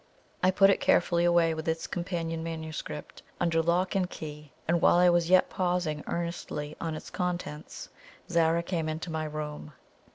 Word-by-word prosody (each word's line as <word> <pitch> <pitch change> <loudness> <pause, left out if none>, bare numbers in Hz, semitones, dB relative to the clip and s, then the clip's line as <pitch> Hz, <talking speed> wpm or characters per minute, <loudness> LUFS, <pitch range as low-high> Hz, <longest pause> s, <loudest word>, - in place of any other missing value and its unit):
I 185 - +4
put 195 +1 +6
it - - +1
carefully 170 0 +3
away 170 -1 +4
with 160 0 -5
its 160 0 -1
companion 165 -2 -3
MS. 160 -1 -4 0.6
under 165 -1 +2
lock 175 +4 +1
and 185 -3 +1
key, 150 -3 -8 0.2
and 170 +1 +2
while - - +6
I 175 0 +6
was 175 -1 +2
yet 185 0 +6
pausing 175 -5 -1
earnestly 170 -3 -4
on 165 -1 -2
its - - -9
contents, 175 -4 -4 0.4
Zara 170 0 +2
came 165 -3 -2
into 160 +2 -4
my 160 -1 -2
room. 150 0 -6
165 Hz, 165 wpm, -29 LUFS, 160-175 Hz, 0.6 s, put